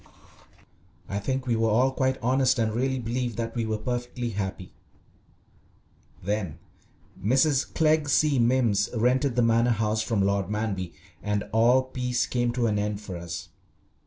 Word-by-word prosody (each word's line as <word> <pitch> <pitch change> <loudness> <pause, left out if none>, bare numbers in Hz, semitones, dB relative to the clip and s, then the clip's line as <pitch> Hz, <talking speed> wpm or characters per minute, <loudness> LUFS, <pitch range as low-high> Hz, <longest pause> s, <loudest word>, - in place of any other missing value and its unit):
I 100 - -2
think 130 +5 -2
we 120 -2 +1
were 115 0 +2
all 125 +5 +3
quite 130 0 0
honest 130 +1 +3
and 110 -2 0
really 130 +3 0
believed 120 -1 -3
that 115 -1 -3
we 115 -2 -1
were 110 -1 -1
perfectly 120 +1 -3
happy. 95 -3 -5 1.5
Then 100 -5 -2 0.7
Mrs. 135 +5 +2
Clegg 155 -1 +2
C. 145 -3 +3
Mimms 115 -4 +2
rented 125 +2 +2
the 120 - +3
Manor 115 +1 +3
House 110 -1 +1
from 110 -3 0
Lord 100 -1 0
Manby, 105 -5 -2 0.3
and 105 -1 -1
all 120 +4 +4
peace 125 -1 -1
came 120 -1 0
to 120 -1 0
an 105 -2 +1
end 105 0 -2
for 105 -3 -7
us. 85 0 -6
115 Hz, 155 wpm, -26 LUFS, 105-130 Hz, 1.5 s, all